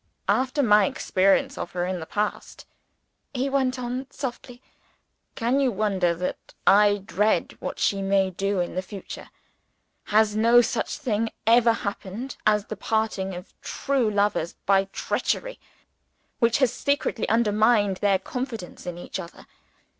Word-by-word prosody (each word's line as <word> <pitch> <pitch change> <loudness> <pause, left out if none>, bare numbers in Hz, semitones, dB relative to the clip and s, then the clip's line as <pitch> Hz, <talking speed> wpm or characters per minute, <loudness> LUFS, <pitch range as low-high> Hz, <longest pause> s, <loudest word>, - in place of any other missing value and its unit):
"After 265 +3 +1
my 210 -4 +5
experience 190 +1 +1
of - - -5
her 175 0 -1
in 185 0 -3
the 160 - -7
past," 210 0 -3 0.7
he 265 +2 0
went 260 -2 +1
on 250 +2 -4
softly, 245 -3 -6 0.8
"can 240 +4 +1
you 265 -3 +2
wonder 190 -5 +1
that 180 +2 -5
I 205 0 +5
dread 205 +4 +1
what - - -5
she 200 -1 +1
may 195 -1 +2
do 195 +1 -1
in 175 - -2
the 185 - -1
future? 195 +1 -9 0.8
Has 210 0 +3
no 230 +2 +6
such 240 - -1
thing 230 -6 -1 0.2
ever 230 +1 +5
happened 205 +4 -5
as 210 -1 +3
the 215 - -6
parting 215 -3 -1
of 180 +2 -10
true 270 -5 0
lovers 205 -5 0
by 195 0 +4
treachery - - -2 0.8
which 230 -1 +3
has 260 -4 +2
secretly 280 -5 -1
undermined 215 -2 +3
their 200 -1 +2
confidence 225 -3 -6
in 175 -1 -4
each 175 - -6
other. 170 - -10
210 Hz, 145 wpm, -25 LUFS, 195-240 Hz, 0.8 s, no